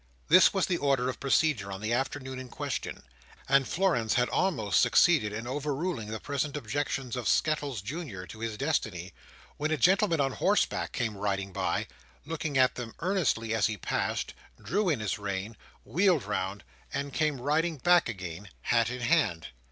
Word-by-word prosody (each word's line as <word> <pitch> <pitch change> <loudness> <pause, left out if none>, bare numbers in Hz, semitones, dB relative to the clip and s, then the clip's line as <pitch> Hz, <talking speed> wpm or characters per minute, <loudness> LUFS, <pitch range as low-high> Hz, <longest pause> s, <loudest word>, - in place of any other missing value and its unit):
This 185 +3 +8
was 195 -2 +1
the 180 - 0
order 135 -3 +1
of 130 - -5
procedure 135 -7 +1
on 95 - -5
the 110 +3 -1
afternoon 130 +1 -2
in 130 -1 -8
question; - - -4 0.4
and 135 -1 +4
Florence 165 - +1
had 125 0 +2
almost 120 - +2
succeeded 155 -12 +4
in 115 +3 -5
overruling 145 -1 -2
the 110 +1 -4
present 145 +2 -2
objections 135 0 -2
of 125 -2 -3
Skettles 145 -8 +1
Junior 120 - -6
to 110 - -11
his 115 -1 -4
destiny, 100 - -2 0.4
when 150 +1 -1
a 155 - +1
gentleman 190 -2 +3
on 135 -1 +2
horseback 205 +9 +1
came 115 -3 -2
riding 100 -1 -2
by, - - -1 0.4
looked 160 0 -3
at 130 -1 +5
them 120 -2 -7
earnestly 155 - 0
as 110 - +3
he 110 -1 -4
passed, - - -2 0.3
drew 200 +1 0
in 140 -9 0
his 105 -1 -2
rein, 100 +2 -4 0.3
wheeled 175 - +2
round, 100 -1 -3 0.3
and 140 -1 -3
came 150 -4 0
riding 155 +5 0
back 175 +2 +4
again, 95 -2 -6
hat 115 -1 +2
in 125 0 -5
hand. 120 - +1
130 Hz, 170 wpm, -29 LUFS, 110-155 Hz, 0.4 s, This